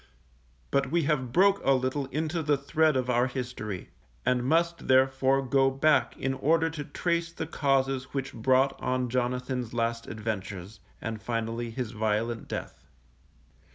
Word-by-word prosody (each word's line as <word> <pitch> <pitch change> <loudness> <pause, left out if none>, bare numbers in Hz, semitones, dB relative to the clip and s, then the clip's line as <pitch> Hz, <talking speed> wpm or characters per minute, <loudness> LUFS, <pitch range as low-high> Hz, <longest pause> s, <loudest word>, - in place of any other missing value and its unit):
But 135 -1 +1
we 170 +2 +2
have 135 -5 0
broke 200 +7 +4
a 135 - +4
little 130 +2 -1
into 155 +4 -2
the 145 -2 +2
thread 150 +1 +2
of 130 -1 -1
our 125 0 +2
history, 120 -7 -5 0.4
and 125 -1 +2
must 170 +5 +1
therefore 130 +1 +3
go 135 +1 +3
back 145 +3 +2
in 135 0 -1
order 160 +5 +2
to 155 -2 -5
trace 170 +3 -1
the 165 - -4
causes 135 -3 +1
which 135 0 -4
brought 130 +3 +2
on 125 -1 0
Jonathan's 125 -1 -2
last 115 0 -1
adventures, 105 -2 -5 0.2
and 110 -1 -4
finally 115 +1 -2
his 115 -1 -4
violent 110 +1 -1
death. - - -6
130 Hz, 150 wpm, -28 LUFS, 120-145 Hz, 0.4 s, broke